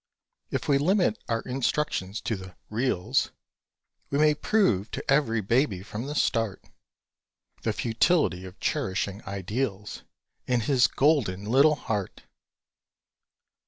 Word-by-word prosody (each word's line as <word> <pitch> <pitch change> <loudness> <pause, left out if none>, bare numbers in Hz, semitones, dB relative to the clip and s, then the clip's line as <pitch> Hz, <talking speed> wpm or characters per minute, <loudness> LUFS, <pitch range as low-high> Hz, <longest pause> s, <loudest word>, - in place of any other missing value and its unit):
If - - -3
we 140 -1 +4
limit 190 +7 +2
our 115 -1 0
instruction 125 -6 -1
to 110 +1 -2
the 95 -2 -10 0.2
"reals," 110 -5 0 0.8
We 140 - 0
may 150 0 +5
prove 145 - +1
to - - -4
ev'ry 115 -6 +2
baby 105 -2 +1
from 110 +5 -6
the 145 - -4
start, 115 -8 0 1.0
The - - 0
futility 115 - +1
of 90 - -11
cherishing 95 +2 -1
ideals 100 +2 -3 0.5
In 125 -2 +2
his 125 +2 +4
golden 125 -10 +1
little 140 +7 +5
heart! 105 -7 -4
115 Hz, 120 wpm, -27 LUFS, 100-140 Hz, 1.0 s, may